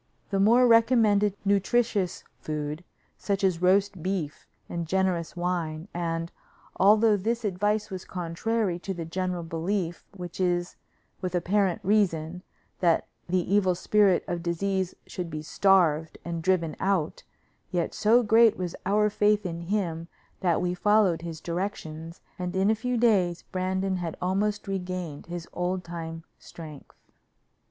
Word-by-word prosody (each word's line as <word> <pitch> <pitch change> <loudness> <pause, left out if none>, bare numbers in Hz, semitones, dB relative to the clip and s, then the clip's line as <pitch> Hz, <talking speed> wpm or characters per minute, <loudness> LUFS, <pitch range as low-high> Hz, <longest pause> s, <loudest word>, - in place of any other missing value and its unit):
The 195 - +1
Moor 235 +5 +5
recommended 225 -4 +4
nutritious 200 -1 +1 0.2
food, 150 +1 -4 0.4
such 200 -1 -1
as 180 -3 +2
roast 195 0 +2
beef 180 -5 -3 0.2
and 170 -1 -4
generous 185 -2 0
wine, 175 -1 -2
and, 165 -1 -2 0.5
although 210 +2 +5
this 225 +4 -1
advice 210 +2 0
was 185 -1 -5
contrary 180 +2 -2
to 190 +1 -5
the 170 -1 -5
general 180 +1 -2
belief, 170 +2 -2
which 175 -1 -7
is, 175 -1 0 0.5
with 185 -1 -2
apparent 185 +1 +1
reason, 180 -4 +1 0.4
that 170 -3 +3 0.2
the 185 +1 0
evil 190 -3 +3
spirit 195 +1 +3
of 175 -1 -2
disease 185 +2 -1
should 180 -2 -5
be 155 -1 -5
starved 165 -3 +2
and 170 -1 -3
driven 170 -3 +1
out, 190 -6 0 0.5
yet 175 -2 -1
so 225 +3 +4
great 225 0 +5
was 180 -2 -4
our 210 +2 +3
faith 210 0 +2
in 170 -1 -4
him 170 -5 -1 0.3
that 175 -3 +1
we 180 0 0
followed 195 -2 +3
his 165 -2 -6
directions, 165 -2 -5 0.2
and 180 0 -3
in 195 +3 +3
a - - +2
few 250 +3 -2
days 195 -7 +2
Brandon 190 +1 -1
had 170 -2 -4
almost 200 +3 -1
regained 180 -6 -4
his 175 -1 -6
old 180 +1 -2
time 165 -1 -6 0.2
strength. 155 -4 -11
185 Hz, 140 wpm, -27 LUFS, 170-205 Hz, 0.5 s, Moor